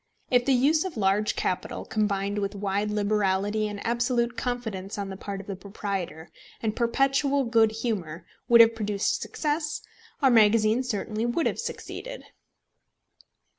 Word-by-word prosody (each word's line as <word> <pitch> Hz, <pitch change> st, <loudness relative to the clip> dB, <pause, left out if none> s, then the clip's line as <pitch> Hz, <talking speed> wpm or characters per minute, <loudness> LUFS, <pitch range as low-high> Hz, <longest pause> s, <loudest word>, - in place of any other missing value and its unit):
If 245 Hz, -1 st, +4 dB
the 275 Hz, -, +3 dB
use 290 Hz, +5 st, +3 dB
of 375 Hz, -9 st, -6 dB
large 205 Hz, +1 st, +1 dB
capital, 180 Hz, -, -2 dB
combined 205 Hz, -1 st, -1 dB
with 200 Hz, 0 st, -3 dB
wide 200 Hz, +1 st, -1 dB
liberality 205 Hz, 0 st, +1 dB
and 205 Hz, -1 st, -6 dB
absolute 240 Hz, 0 st, 0 dB
confidence 220 Hz, -7 st, -4 dB
on 200 Hz, -1 st, -3 dB
the 190 Hz, -, -6 dB
part 195 Hz, 0 st, -6 dB
of 195 Hz, -, -9 dB
the 200 Hz, -, -5 dB
proprietor, 190 Hz, -5 st, -5 dB, 0.3 s
and 215 Hz, -2 st, -2 dB
perpetual 275 Hz, +3 st, +2 dB
good 225 Hz, -2 st, +4 dB
humour, 190 Hz, -8 st, -4 dB, 0.2 s
would 235 Hz, -1 st, +9 dB
have 230 Hz, 0 st, +6 dB
produced 210 Hz, -2 st, -1 dB
success, 300 Hz, 0 st, -2 dB, 0.4 s
our 270 Hz, -3 st, +4 dB
magazine 220 Hz, +1 st, +4 dB
certainly 220 Hz, -1 st, -2 dB
would 275 Hz, +7 st, 0 dB
have -, -, -1 dB
succeeded. -, -, -6 dB
215 Hz, 145 wpm, -26 LUFS, 200-240 Hz, 0.4 s, would